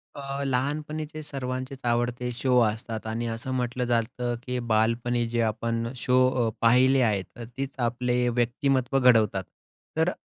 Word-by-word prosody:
अ, 140 0 -4
लहानपणीचे 150 +4 -2
सर्वांचेच 130 -1 -5
आवडते 120 +1 -1
शो 125 0 +3
असतात 110 0 -2
आणि 115 +1 -2
असं 115 +3 -4
म्हटलं 125 0 -1
जातं, 120 +1 -1
की 125 -2 -3
बालपणी 115 +1 +1
जे 120 0 0
आपण 115 +1 -1
शो 125 +1 +1 0.3
अ, - - +1
पाहिले 130 +3 +5
आहेत. 105 -5 +1
तर 120 - -6
तीच 135 0 -3
आपले 125 0 0
व्यक्तिमत्त्व 125 +2 +1
घडवतात. 110 -6 +4 0.5
तर 160 +2 +3
125 Hz, 140 wpm, -26 LUFS, 115-130 Hz, 0.5 s, पाहिले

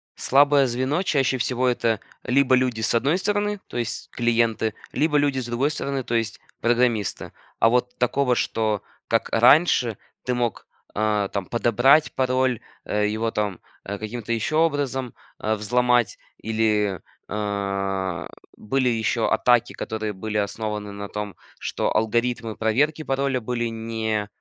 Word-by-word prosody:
слабое 140 +1 +4
звено 130 +8 0
чаще 135 -6 +1
всего- 125 +1 0
это 115 -4 +1 0.2
либо 130 +1 +4
люди 125 -3 0
с 110 - +1
одной 140 +9 +2
стороны, 205 +1 0
то - - -7
есть 120 -1 -3
клиенты, 115 -2 +1 0.2
либо 150 -1 +2
люди 145 -2 +2
с 125 - -4
другой 120 +4 0
стороны- 140 -3 -3
то 120 - -2
есть 115 -1 -1 0.2
программисты. 120 -3 +1 0.3
А 115 - +5
вот 125 +1 +1
такого, 125 0 +2
что 110 -3 0 0.3
как - - +1
раньше, 120 - +4 0.3
ты 125 - -1
мог, 120 -3 -2 0.3
а, 105 -1 +1
там 100 -2 -3
подобрать 120 - +3
пароль, 130 -2 +1 0.3
его, 105 +2 0
там, 105 -4 -2 0.3
э, 100 +1 -4
каким-то 115 +1 -4
еще 115 +7 -1
образом, 140 -6 0 0.3
э, 110 - 0
взломать, 120 +2 +2 0.2
или, 105 -3 0 0.3
а, 100 -3 -2 0.3
были 130 +3 0
еще 115 0 0
атаки, 120 -2 +3
которые 110 -1 -4
были 105 +2 -4
основаны 105 0 -3
на 100 0 -6
том, 105 -1 -5 0.2
что - - -2
алгоритмы 115 0 0
проверки 145 +8 +1
пароля 135 -2 0
были 120 0 -2
не, 110 -2 -2
120 Hz, 140 wpm, -24 LUFS, 110-130 Hz, 0.3 s, А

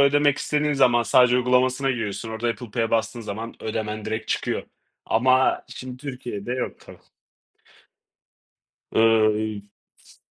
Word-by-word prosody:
ödemek 145 0 +4
istediğin 150 0 0
zaman 125 -4 +4
sadece 125 +3 +4
uygulamasına 125 +2 +2
giriyorsun. 115 -3 -3
Orada 110 +2 -2
Apple 120 -1 -5
Pay'e 115 +1 -1
bastığın 115 +1 0
zaman 110 +1 -6
ödemen 110 -1 -4
direkt 110 +1 -4
çıkıyor. - - -1 0.4
Ama 130 +3 +3
şimdi 130 -1 -8
Türkiye'de 125 -5 -6
yok 125 0 -4
tabii. - - -14 1.9
Iıı 110 -1 +4
y 110 -1 -3 0.5
s - - -20
120 Hz, 130 wpm, -24 LUFS, 110-130 Hz, 1.9 s, ödemek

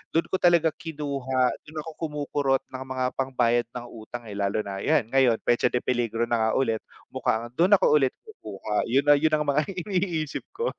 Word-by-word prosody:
dun 165 - +4
ko 190 - +1
talaga 170 -2 +4
kinuha, 140 -5 -1 0.2
dun 155 0 -6
ako 160 0 -10
kumukurot 145 -3 -1
ng 130 - -6
mga 130 -1 -3
pambayad 120 -3 +1
ng 120 -1 -5
utang, 115 +2 -8
eh. 110 - -10
Lalo 100 +2 0
na, 95 -1 -5
ayan, 150 +2 +2
ngayon 130 -4 +4
petsa 120 +1 +3
de 125 0 -1
peligro 120 -2 0
na 115 -1 +1
nga 110 - +1
ulit, 115 -5 +1 0.3
mukhang 115 +2 -1
dun 185 +4 +6
ako - - +3
ulit 135 -1 +1
kukuha. 105 - -4
Yun 135 +4 +2
na 145 - +7
yun 155 +1 +2
ang 150 - 0
mga 145 +1 +1 0.2
iniisip 175 -6 -2
ko. 470 +1 -1
135 Hz, 195 wpm, -26 LUFS, 120-155 Hz, 0.3 s, na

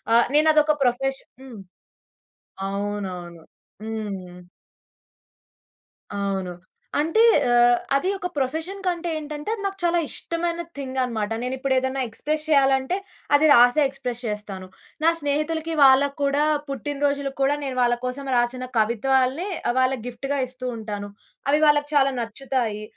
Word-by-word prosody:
ఆహ్, 235 - +6
నేను 310 +1 +5
అదొక 305 0 +4
ప్రొఫెషన్ 265 +2 -1
హ్మ్. 250 -5 -10 1.1
అవునవును. 195 -4 -5 0.4
హ్మ్. 195 -5 -6 1.7
అవును. 195 -2 -2 0.5
అంటే 325 +9 +2 0.3
ఆహ్, 240 0 +5 0.2
అది 365 +7 +1
ఒక 360 - -3
ప్రొఫెషన్ 320 +9 -2
కంటే 345 -1 -1
ఏంటంటే, 300 +2 -6
అది 420 - -9
నాకు 390 0 -3
చాలా 345 0 +3
ఇష్టమైన 340 0 -3 0.2
థింగ్ 265 -1 -5
అనమాట. 225 -4 -2
నేను 250 - -2
ఇప్పుడు 265 0 0
ఏదైనా 260 +1 -1
ఎక్స్‌ప్రెస్ 305 +7 -3
చేయాలంటే, 270 +2 +3 0.4
అది 295 +2 +4
రాసే 245 +3 +6
ఎక్స్‌ప్రస్ 250 -3 -5
చేస్తాను. 205 -3 -5 0.4
నా 330 - +6
స్నేహితులకి 315 +2 -1
వాళ్ళకి 275 +2 +5
కూడా 280 +1 +2 0.3
పుట్టినరోజులకు 280 +1 -2
కూడా 285 +2 +2
నేను 265 -2 -3
వాళ్ళ 240 0 +3
కోసం 270 +2 -4
రాసిన 250 +1 -1
కవిత్వాల్ని, 260 - +1 0.3
వాళ్ళకి 255 -2 +1
గిఫ్ట్‌గా 275 +3 -3
ఇస్తూ 255 0 -9
ఉంటాను. 205 -2 -5 0.4
అవి 295 +2 +3
వాళ్ళకి 290 0 +3
చాలా 275 -1 +4
నచ్చుతాయి. 230 -2 -3
265 Hz, 130 wpm, -23 LUFS, 235-295 Hz, 1.7 s, ఆహ్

